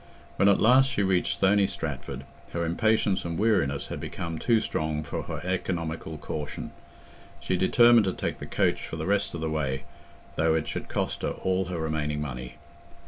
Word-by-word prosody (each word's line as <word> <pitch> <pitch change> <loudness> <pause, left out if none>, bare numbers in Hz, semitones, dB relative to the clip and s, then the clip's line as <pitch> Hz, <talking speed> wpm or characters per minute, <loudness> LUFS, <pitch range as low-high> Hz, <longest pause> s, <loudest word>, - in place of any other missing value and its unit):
When 100 - +5
at 100 - +4
last 130 +4 +6
she 100 - 0
reached 95 -2 +2
Stony 100 0 +4
Stratford, 70 -6 -5 0.3
her 85 0 -1
impatience 105 +3 +2
and 85 -1 -3
weariness 70 -11 +1
had - - -4
become 85 -2 -5
too 115 -2 +3
strong 80 -6 -2
for 70 - -4
her - - -5
economical 85 -3 -3
caution; 75 -1 -5 0.7
she 95 - -1
determined 120 +4 +6
to 95 - 0
take - - -3
the - - -7
coach - - +1
for - - -6
the 80 0 -4
rest 100 -2 +1
of 85 - -5
the 80 - -1
way, 70 -3 -1 0.5
though 80 0 +3
it 80 - -1
should - - -4
cost - - -2
her - - -2
all 95 0 +1
her 90 -1 -4
remaining 75 -2 -1
money. 65 -4 -5
85 Hz, 185 wpm, -27 LUFS, 75-100 Hz, 0.7 s, last